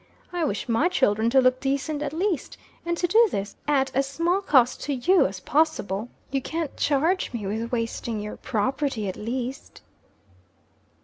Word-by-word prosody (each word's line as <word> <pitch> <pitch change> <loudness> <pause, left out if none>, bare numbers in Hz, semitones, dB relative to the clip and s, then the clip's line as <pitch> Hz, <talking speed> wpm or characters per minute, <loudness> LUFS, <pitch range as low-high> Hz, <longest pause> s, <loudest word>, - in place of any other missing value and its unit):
I 350 -1 -1
wish 210 -8 -2
my 245 +9 +2
children 220 - +2
to 265 +2 +5
look 255 0 +3
decent 280 +2 -1
at 295 - -2
least; 345 0 -2 0.3
and 340 0 0
to 350 - +1
do 450 +6 +5
this 200 - -4
at 270 -2 +2
as 270 +1 +2
small 340 +7 0
cost 255 -9 +3
to 285 - -1
you 350 - +4
as 185 0 -7
possible. 245 - 0 0.2
You 270 -1 0
can't 320 +1 -4
change 320 +6 +1
me 225 -4 -4
with 220 +4 -3
wasting 230 -1 -2
your 210 0 -6
property, 260 0 -1
at 185 - -3
least." 250 +4 -5
270 Hz, 170 wpm, -25 LUFS, 230-315 Hz, 0.3 s, to